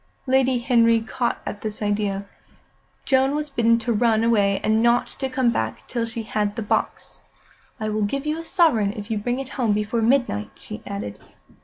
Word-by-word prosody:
Lady 260 -1 +3
Henry 230 -1 +4
caught 235 +2 -2
at 205 - -5
this 215 -1 -4
idea. 205 -1 -1 0.8
Joan 265 +1 +3
was 300 -1 -3
bidden 230 -2 +3
to 235 +1 -1
run 225 0 +2
away 205 -4 +3
and 220 +1 +2
not 235 +1 +3
to 265 - -5
come 255 -2 +2
back 110 - -3
till 235 -1 -2
she 230 0 -5
had 210 -1 -1
the 225 - -3
box. 205 - -2 0.6
"I 215 0 -2
will 215 0 -1
give 275 +8 -1
you 305 +2 -1
a - - -6
sovereign 300 - +2
if 210 0 -7
you 215 - 0
bring 245 +4 -1
it 270 -1 -6
home 230 -4 +2
before 210 +2 -1
midnight," 230 - +1
she - - -9
added. 100 +1 -5
230 Hz, 190 wpm, -23 LUFS, 210-255 Hz, 0.8 s, Henry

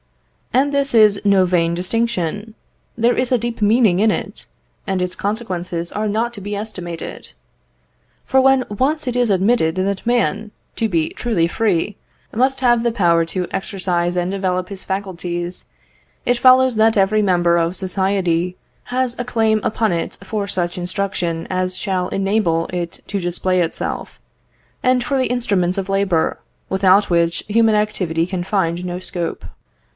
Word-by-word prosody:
"And 280 +3 +2
this 280 -3 +1
is 210 -3 +5
no 200 -2 +4
vain 170 -2 +1
distinction; 205 +1 -2 0.4
there 235 +1 +3
is 255 0 0
a 250 - +4
deep 235 0 -4
meaning 210 -3 +4
in 220 +2 +4
it, - - -4 0.4
and 190 -1 0
its 180 0 -2
consequences 180 -5 -3
are 210 +1 -2
not 230 +3 -1
to 205 - -9
be 205 +2 -4
estimated. 185 -5 -7 0.9
For 265 0 +3
when 265 -1 +4
once 280 +9 -1
it 250 - -1
is 245 -2 +2
admitted 195 -3 +2
that 190 +1 -2
man, 235 -2 0 0.2
to 225 - -1
be 165 -4 0
truly 205 -9 0
free, 205 0 0 0.4
must 265 +3 +1
have 240 -2 +4
the 235 0 +1
power 170 -6 +2
to 180 +2 -3
exercise 180 -3 -1
and 180 +1 0
develop 185 -1 -1
his 195 -2 -8
faculties, 180 -2 -4 0.6
it 245 0 +1
follows 255 -1 +5
that 220 0 +4
every 200 +2 +3
member 175 -3 +3
of 170 +1 0
society 185 -2 0 0.3
has 250 -1 +1
a - - 0
claim 220 -3 +1
upon 220 -1 0
it 170 - -3
for 210 -2 -3
such 180 -1 -2
instruction 175 -2 -2
as 185 0 -1
shall 185 -2 -1
enable 195 -4 +1
it 175 -1 -4
to 200 - -2
display 180 +1 0
itself, 165 - -3 0.6
and 255 -1 +3
for 275 +2 -1
the 260 - +1
instruments 200 -7 0
of 195 0 -3
labour, 195 -4 +1 0.3
without 190 +1 +3
which 170 -1 +1
human 220 +1 +3
activity 185 -6 0
can 180 -1 -3
find 175 -3 -1
no 180 0 -4
scope. 175 -2 -5
195 Hz, 160 wpm, -19 LUFS, 180-225 Hz, 0.9 s, is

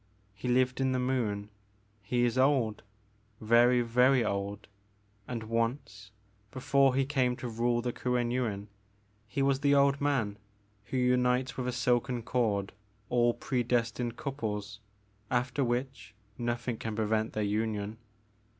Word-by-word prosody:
He 110 - -7
lived 125 +1 +2
in 130 -1 +1
the 130 - 0
Moon. 115 -6 -1 0.5
He 120 +5 +1
is 120 - 0
old 130 -5 +2 0.3
— 105 0 -37
very, 120 +1 +6
very 125 +1 +3
old, 100 0 -3 0.6
and 120 -3 -4
once, 115 -2 -2 0.4
before 135 +2 +2
he 135 0 +2
came 130 -3 +1
to 125 - -6
rule 120 +1 0
the 125 -1 -2
Kuen 125 -1 -1
Yuin, 110 -5 -2 0.6
he 135 +5 -1
was 135 -1 +2
the 140 0 +3
old 140 0 +3
man 120 -8 0 0.5
who 125 +4 -3
unites 125 +1 +2
with 125 -1 -3
a - - 0
silken 125 -1 0
cord 105 -5 0 0.4
all 120 -1 +3
predestined 120 -1 -1
couples, 105 -7 -4 0.5
after 125 +3 0
which 120 -3 -3 0.2
nothing 120 0 -2
can 110 -1 -4
prevent 110 0 0
their 110 - -1
union. 105 +1 -2
120 Hz, 140 wpm, -30 LUFS, 110-130 Hz, 0.6 s, very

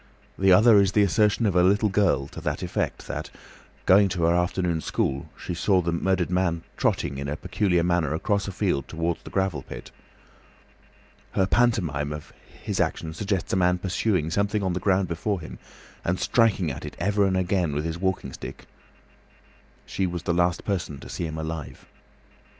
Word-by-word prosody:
The 95 0 +3
other 105 +2 +7
is 95 -2 +1
the 105 - +4
assertion 105 +4 +2
of 100 -4 +1
a 90 - +5
little 100 +4 +3
girl 95 -9 +2
to - - -9
the - - -1
effect - - -2
that, - - -5 0.6
going 100 +1 +6
to 90 -2 -2
her 85 +1 +4
afternoon 90 -1 0
school, 70 -2 -2
she - - -5
saw 95 +3 +2
the 85 -1 -1
murdered 90 +1 0
man 90 -2 0
"trotting" 70 0 0
in 70 - -4
a 75 - -3
peculiar 90 -1 +1
manner 85 -4 +1
across 100 +5 0
a - - -3
field 90 -8 -1
towards 85 +1 -2
the - - -10
gravel 95 -7 -1
pit. - - -10 1.4
Her 95 - +2
pantomime 90 -11 +1
of 75 0 -8 0.3
his - - -2
action 80 -1 -1
suggests 100 +1 -2
a - - +3
man 90 0 +3
pursuing 90 -2 0
something 100 +2 0
on 95 -2 0
the 90 - -1
ground 95 0 +2
before 90 +4 -2
him 80 - -9 0.4
and 90 +1 -1
striking 105 -8 +2
at - - -7
it - - -7
ever 100 +3 +2
and 95 -1 +1
again 90 -3 +1
with 75 +2 -1
his 80 +1 -3
walking 95 -7 -2
stick. - - -9 1.2
She 95 - -1
was 85 -1 -5
the 85 - 0
last 90 0 +1
person 90 -8 -2
to - - -10
see 85 - -3
him 80 0 -6
alive. 80 -5 -6
90 Hz, 185 wpm, -25 LUFS, 85-100 Hz, 1.4 s, other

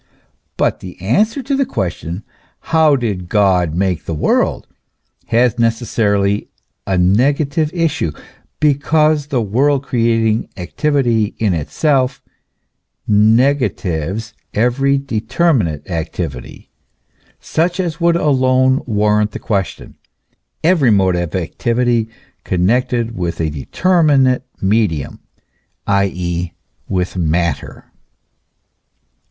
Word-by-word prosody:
But - - +1
the 90 -1 -10
answer 210 - +1
to 275 +3 -1
the 275 - +2
question: 95 - -4 0.5
How 160 -3 +5
did 100 -9 -3
God 90 -6 +2
make 90 -4 -1
the 80 - -3
world? 75 - +1 0.6
has 120 +1 +2
necessarily 105 -3 +1 0.4
a 95 - +1
negative 140 - +2
issue, 165 - -1 0.5
because 150 0 +2
the 130 -5 0
world 135 +7 +1
creating 115 -3 +1
activity 120 - 0
in 105 -4 +1
itself 130 - 0 0.9
negatives 110 - +1 0.2
every 135 +5 +2
determinate 115 - 0
activity, 80 -7 -5 0.7
such 175 +3 -1
as 170 -3 -2
would 170 0 +3
alone 130 -4 +2
warrant 105 -1 +1
the - - -4
question, 100 -4 -3 0.7
every 160 -6 +4
mode 95 -4 +3
of 85 -1 -3
activity 115 +5 0 0.3
connected 115 +5 0
with 85 -2 -3
a 80 -2 -1
determinate 140 - +2 0.2
medium, 95 -7 0 0.7
i.e., 90 -3 -1 0.4
with 90 -1 -1
matter. 85 0 -2
115 Hz, 95 wpm, -17 LUFS, 95-140 Hz, 0.9 s, How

